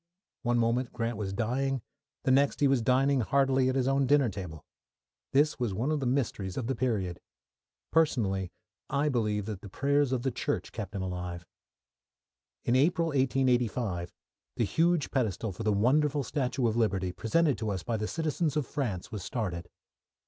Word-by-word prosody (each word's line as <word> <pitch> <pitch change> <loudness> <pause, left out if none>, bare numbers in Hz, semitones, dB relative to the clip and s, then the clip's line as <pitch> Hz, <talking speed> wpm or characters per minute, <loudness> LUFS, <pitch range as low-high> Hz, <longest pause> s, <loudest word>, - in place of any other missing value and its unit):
One 120 -1 +1
moment 120 +2 +1
Grant 115 0 -2
was 100 -2 -3
dying, 125 +4 -1 0.4
the 130 - +2
next 140 +2 +3
he 145 - +4
was 135 -3 +3
dining 130 +3 +3
heartily 135 +1 +2
at 130 - 0
his 130 -1 +1
own 135 0 +2
dinner 140 -2 +4
table. 90 -6 -7 0.7
This 145 +2 +3
was 115 -6 -1
one 125 +9 0
of 155 - +1
the 135 - -1
mysteries 115 -7 -1
of 130 - -2
the 135 - 0
period. 105 -9 -1 0.7
Personally, 100 - +1 0.4
I 145 +2 +1
believe 105 -6 0
the 105 -2 -4
prayers 140 +4 +1
of 125 -2 0
the 135 - 0
Church 145 +4 -2
kept 105 -2 -6
him 95 - -2
alive. 90 -1 -5 1.2
In 120 - +2
April, 165 +5 +3
1885, 125 - +1 0.4
the - - +1
huge 170 -2 +1
pedestal 110 -5 -1
for 90 - -8
the 110 -1 +1
wonderful 140 +7 +2
statue 130 -1 -1
of 110 - 0
Liberty, 95 -5 +1
presented 135 - +1
to 110 - -2
us 95 -3 -3
by 115 - -1
the 105 0 -2
citizens 160 0 -1
of 150 - 0
France, 115 - -3
was 105 -3 -5
started. 90 -6 -3
125 Hz, 170 wpm, -29 LUFS, 105-140 Hz, 1.2 s, he